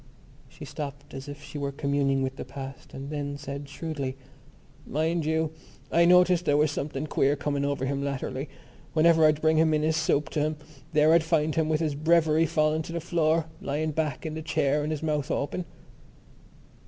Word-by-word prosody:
She - - -10
stopped, 145 -1 -7
as 135 +1 -7
if 145 +1 -9
she 145 +1 -7
were 140 -1 -2
communing 140 -1 0
with 130 0 -2
the - - -6
past 135 +1 -9
and 135 +2 -6
then 145 -1 -3
said 140 0 -7
shrewdly: 140 -3 -4 0.7
"Mind 160 +3 0
you, 160 -1 +1 0.4
I 170 +1 +5
noticed 180 0 +5
there 145 -2 +3
was 150 0 +3
something 145 0 -3
queer 140 -1 +2
coming 140 -1 -2
over 140 -2 -1
him 140 +1 -1
latterly. 140 0 -3 0.4
Whenever 160 0 +5
I'd 155 0 +1
bring 155 0 +3
in 155 -1 +3
his 160 0 +2
soup 155 -2 +1
to - - -2
him 155 +1 0 0.3
there 155 0 +5
I'd 170 - +6
find 160 -2 +1
him 160 -1 +1
with 155 0 +1
his 155 -3 0
breviary 160 +1 +3
fallen 155 +1 +1
to 165 - -7
the 170 - -1
floor, 165 -1 +1 0.2
lying 155 +3 -1
back 150 -1 -2
in 155 - -3
the 160 - -4
chair 150 -2 +1
and 150 +1 -2
his 155 0 -3
mouth 150 -3 -1
open." 145 +5 -2
150 Hz, 190 wpm, -27 LUFS, 140-160 Hz, 0.7 s, I'd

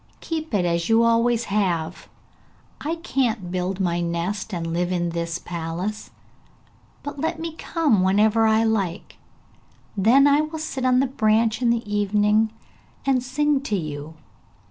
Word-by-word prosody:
keep 320 -1 -4
it 195 -5 +1
as 170 +1 0
you 225 +1 +5
have 230 - +4
always 230 0 +2
done! 180 -5 0 0.9
I 320 +3 -1
can't 225 - -1
build 185 +1 -2
my 175 -2 0
nest 175 +5 -3
and 165 -3 -3
live 175 +1 -1
in 175 -1 -1
this 170 0 -3
palace, 175 +6 -5 0.9
but 285 0 -6
let 320 +2 -2
me 330 0 -4
come 310 - +1
whenever 210 +4 +3
I 220 +1 +3
like, 200 -6 -2 0.8
then 230 +8 +5
I 285 +1 +5
will 310 +1 -4
sit 275 -4 -4
on 255 0 +4
the - - +2
branch 220 -2 +1
in 240 - +2
the 235 -1 0
evening, 210 +1 +2 0.6
and 265 -2 +2
sing 280 +3 0
to 215 -7 -2
you. 155 -2 -5
215 Hz, 155 wpm, -23 LUFS, 180-255 Hz, 0.9 s, you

